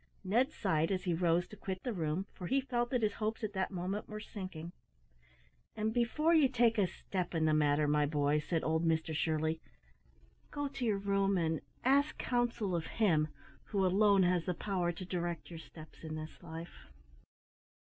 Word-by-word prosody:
Ned 230 +8 +2
sighed 165 -4 0
as 185 -1 -1
he 180 -3 0
rose 170 +1 +2
to - - -10
quit 190 -2 -5
the 245 - -2
room, 165 +1 -1
for 180 - -6
he 270 - +3
felt 240 -3 -1
that 245 -3 0
his 210 -1 +2
hopes 220 +1 -3
at 210 -1 -2
that 190 -1 0
moment 190 +3 -3
were 215 0 -5
sinking. 185 -6 -7 1.0
"And 220 +1 -1
before 275 +8 +2
you 305 -5 +6
take 235 -3 +3
a 195 - +4
step 180 0 -4
in 160 -1 +2
the 155 - +3
matter, 150 0 +3
my 150 0 +3
boy," 145 0 +2
said 160 +2 -1
old 160 +1 +1
Mr 160 -1 +1
Shirley, 160 +1 0 0.9
"go 290 -1 -2
to 275 -2 -4
your 215 -3 +2
room 195 0 +1
and 160 -2 0 0.2
ask 280 +4 +3
counsel 235 -6 0
of 165 -1 -2
Him 165 -9 +3 0.4
who 195 -3 0
alone 200 +1 +5
has 180 -1 +2
the 180 - -1
power 180 -2 -1
to 180 +2 -7
direct 175 -1 -3
your 165 - -7
steps 155 -1 -13
in 155 -1 -5
this 155 0 -8
life." 160 - -9
185 Hz, 190 wpm, -34 LUFS, 160-215 Hz, 1.0 s, you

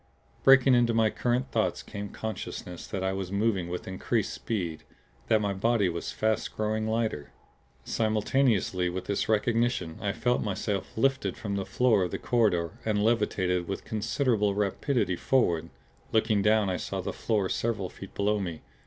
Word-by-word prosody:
Breaking 135 -1 +7
into 120 -2 +3
my 110 -1 +3
current 125 +1 0
of - - -25
thoughts 110 -2 0
came 100 -1 -6
consciousness 95 -5 -6
that 95 -2 -3
I 95 0 0
was 95 -1 -4
moving 100 -4 0
with 90 0 -5
increased 95 -8 -1
speed; 85 - -3 0.4
that 110 - +3
my 100 -1 0
body 105 0 +2
was 85 +4 -4
fast 110 +1 -1
growing 110 0 0
lighter. 110 -10 -1 0.5
Simultaneously 110 -4 +1
with 90 +1 -4
this 100 +1 -1
recognition 115 -5 +1
I 100 - 0
felt 125 +4 0
myself 100 -1 -3
lifted 135 +3 +1
from 100 -3 -3
the 100 -1 -3
floor 120 -5 +3
of 90 - 0
the - - -3
corridor 95 -9 +1
and 105 -2 +1
levitated 95 -6 +1
with 95 - -4
considerable 110 -1 0
rapidity 105 0 0
forward; 85 -11 +1 0.4
looking 110 -2 +2
down 105 0 +3
I 90 -1 0
saw - - -4
that - - -4
floor 105 -4 0
several 105 -3 -1
feet 95 - -11
below 105 +1 +1
me. 85 -5 -5
105 Hz, 165 wpm, -28 LUFS, 95-115 Hz, 0.5 s, Breaking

